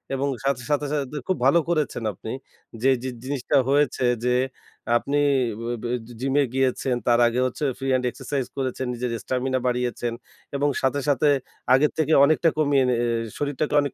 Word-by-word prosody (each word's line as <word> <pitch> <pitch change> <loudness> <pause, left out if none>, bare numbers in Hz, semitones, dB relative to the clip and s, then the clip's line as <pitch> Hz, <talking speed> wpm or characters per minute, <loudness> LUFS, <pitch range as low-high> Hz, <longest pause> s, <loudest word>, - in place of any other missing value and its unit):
এবং 135 +1 -1 0.2
সাথে, 135 -2 0
সাথে, 145 0 +1
সাথে 145 0 -2
খুব 185 - +1
ভালো 140 +6 +5
করেছেন 155 -7 0
আপনি 110 +4 -8 0.5
যে, 135 - +4
যে 130 - -2
জিনিসটা 135 +1 -2
হয়েছে 140 -2 +2 0.2
যে 125 0 +2 0.6
আপনি 140 +4 -2 0.4
ব 115 0 -4
এ - - +2 0.3
জিম 135 0 0
এ - - +4
গিয়েছেন 130 -1 +1
তার 120 -1 +4
আগে 120 +1 -1
হচ্ছে 130 - -6
ফ্রি 135 - -4
হ্যান্ড 130 -1 +1
এক্সারসাইজ 135 +1 -3
করেছেন, 130 -1 -2
নিজের 120 0 -3
স্টামিনা 130 0 -1
বাড়িয়েছেন 120 -1 -1 0.4
এবং 145 +1 +2
সাথে, 135 +2 +1
সাথে 145 +1 +3 0.5
আগের 145 +3 +4
থেকে 155 0 +2
অনেকটা 155 +3 +3
কমিয়ে 145 -3 +3
নি 125 - +2
আ - - +1 0.3
শরীরটাকে 145 +1 -2
অনেক 140 -2 -3
135 Hz, 170 wpm, -24 LUFS, 125-145 Hz, 0.6 s, ভালো